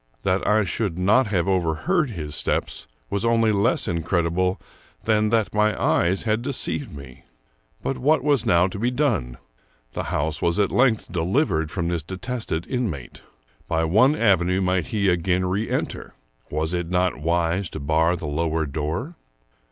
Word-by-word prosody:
That 95 0 0
I 110 0 +4
should 95 -1 -2
not 105 +7 +3
have 95 -4 0
overheard 95 - +1
his 80 -9 -5
steps - - -2 0.2
was 100 - -1
only 115 -1 +3
less 100 +2 +1
incredible 85 +2 0 0.4
than 110 -1 +2
that 110 -2 +1
my 105 0 +1
eyes 95 +3 +2
had 110 0 0
deceived 140 +1 -2
me. 70 -3 -12 0.6
But 135 -1 -2
what 150 +2 +2
was 145 -6 +2
now 85 -6 +4
to 95 +1 -4
be 120 +3 +1
done? 120 - -1 0.6
The - - -3
house 80 +1 -2
was 85 +3 +1
at 100 - +2
length 125 -4 +2
delivered 85 - 0
from 85 -1 -2
this 85 -2 -1
detested 95 - -4
inmate. 105 - -4 0.5
By 80 0 0
one 110 - +4
avenue 95 - +2
might 90 -3 0
he 105 -3 0
again 90 +1 +1
reenter. 100 +5 -3 0.3
Was 80 +3 -1
it 85 -1 -2
not 90 0 +1
wise 85 +3 0
to - - -7
bar 80 +4 +2
the 85 - -7
lower 80 +1 -1
door? 80 - -3
95 Hz, 160 wpm, -23 LUFS, 80-110 Hz, 0.6 s, I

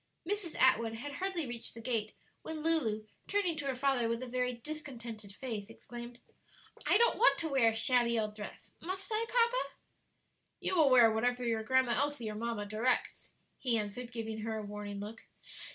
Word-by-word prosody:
Mrs. 400 -4 -2
Atwood 230 -3 +4
had 280 +6 -6
hardly 350 +2 -2
reached 240 -2 -5
the - - -8
gate 225 -2 -1 0.3
when 320 -1 -5
Lulu, 240 -10 +2 0.2
turning 400 -5 +1
to 290 -1 -3
her 265 - 0
father 255 -3 +2
with 230 +2 -1
a - - -5
very 250 0 0
discontented 235 -6 -7
face, 220 -2 -5
exclaimed, 240 +1 -9 0.7
"I - - +6
don't 470 +1 +3
want - - +6
to 330 - 0
wear 265 -5 +5
a 220 - -3
shabby 235 0 +3
old 215 -1 -2
dress! 210 -1 -9
Must 380 +4 -5
I, 440 +1 +1
papa?" 480 +1 +2 0.8
"You - - -1
will 315 -5 +6
wear 240 -3 +7
whatever 245 +3 +1
your 225 -1 +1
Grandma 260 +2 +3
Elsie 270 -3 0
or - - -6
mamma 230 -1 -2
directs," 220 +5 0 0.3
he 240 -3 +2
answered, 220 +3 -4
giving 225 -2 -4
her 220 0 -2
a 215 - -4
warning 205 -1 -6
look. 215 +2 -7
240 Hz, 185 wpm, -33 LUFS, 220-290 Hz, 0.8 s, wear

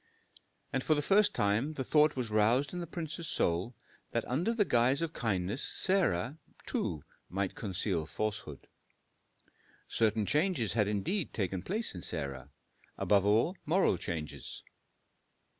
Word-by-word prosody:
And 130 - 0
for 155 - +3
the 145 - +1
first 205 +5 +4
time 105 +9 +1
the 135 - -3
thought 150 +3 +4
was 125 -4 -3
roused 115 +8 +3
in 180 - -3
the 170 - -5
prince's 165 0 -5
soul, 90 +5 0 0.4
that 115 - 0
under 160 - 0
the 225 -3 +2
guise 125 +4 +3
of 165 -1 -3
kindness 105 +1 -1
Sarah, 160 - +1 0.3
too, 75 - -2 0.3
might 95 +1 -2
conceal 95 -5 -2
falsehood. 105 -6 -4 1.2
Certain 110 -1 +1
changes 150 - +1
had 105 -3 +2
indeed 105 - -1
taken 95 -3 -1
place 215 - 0
in 90 - -7
Sarah; 70 -3 -4 0.5
above 100 -1 +3
all, 115 - +3
moral 175 - +3
changes. 75 -5 -5
115 Hz, 140 wpm, -32 LUFS, 95-155 Hz, 1.2 s, first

